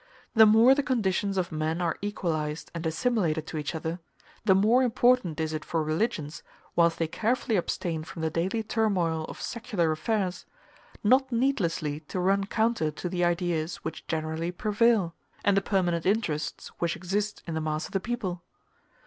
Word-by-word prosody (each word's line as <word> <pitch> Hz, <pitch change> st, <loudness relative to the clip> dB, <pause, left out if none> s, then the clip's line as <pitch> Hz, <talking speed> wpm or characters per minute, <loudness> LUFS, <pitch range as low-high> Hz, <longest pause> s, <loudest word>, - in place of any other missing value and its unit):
The 220 Hz, -1 st, +8 dB
more 225 Hz, +5 st, +7 dB
the 285 Hz, -, +2 dB
conditions 200 Hz, -7 st, 0 dB
of 180 Hz, -2 st, -1 dB
men 155 Hz, +2 st, -1 dB
are 170 Hz, -3 st, 0 dB
equalized 160 Hz, -7 st, -3 dB
and 170 Hz, -1 st, -5 dB
assimilated 160 Hz, -4 st, 0 dB
to 160 Hz, -, -6 dB
each 150 Hz, +2 st, -4 dB
other, 160 Hz, +2 st, -3 dB, 0.5 s
the 190 Hz, -3 st, +5 dB
more 220 Hz, +6 st, +4 dB
important 245 Hz, -, +3 dB
is 160 Hz, 0 st, -1 dB
it 155 Hz, -, -3 dB
for 165 Hz, -2 st, -1 dB
religions, 155 Hz, -1 st, -2 dB, 0.3 s
whilst 170 Hz, -1 st, +4 dB
they 165 Hz, -, 0 dB
carefully 230 Hz, +6 st, 0 dB
abstain 170 Hz, -3 st, -1 dB
from 160 Hz, +1 st, -7 dB
the 160 Hz, -, 0 dB
daily 190 Hz, +7 st, -1 dB
turmoil 185 Hz, -8 st, 0 dB
of -, -, -9 dB
secular 215 Hz, -9 st, -1 dB
affairs, 185 Hz, +3 st, -1 dB, 0.6 s
not 260 Hz, +5 st, +4 dB
needlessly 175 Hz, -, 0 dB
to 185 Hz, -, -3 dB
run 195 Hz, +2 st, +2 dB
counter 220 Hz, -7 st, +1 dB
to 155 Hz, +4 st, -5 dB
the 180 Hz, 0 st, -1 dB
ideas 175 Hz, -2 st, 0 dB
which -, -, -6 dB
generally 160 Hz, +1 st, -2 dB
prevail, 210 Hz, -1 st, +2 dB, 0.3 s
and 200 Hz, -, +4 dB
the 195 Hz, -, +3 dB
permanent 180 Hz, -4 st, 0 dB
interests 190 Hz, -8 st, -1 dB
which 170 Hz, -1 st, 0 dB
exist 200 Hz, +4 st, -2 dB
in 170 Hz, -, -4 dB
the 160 Hz, -, -1 dB
mass 155 Hz, 0 st, -2 dB
of -, -, -10 dB
the 195 Hz, -, 0 dB
people. 190 Hz, -6 st, -3 dB
180 Hz, 170 wpm, -28 LUFS, 160-220 Hz, 0.6 s, The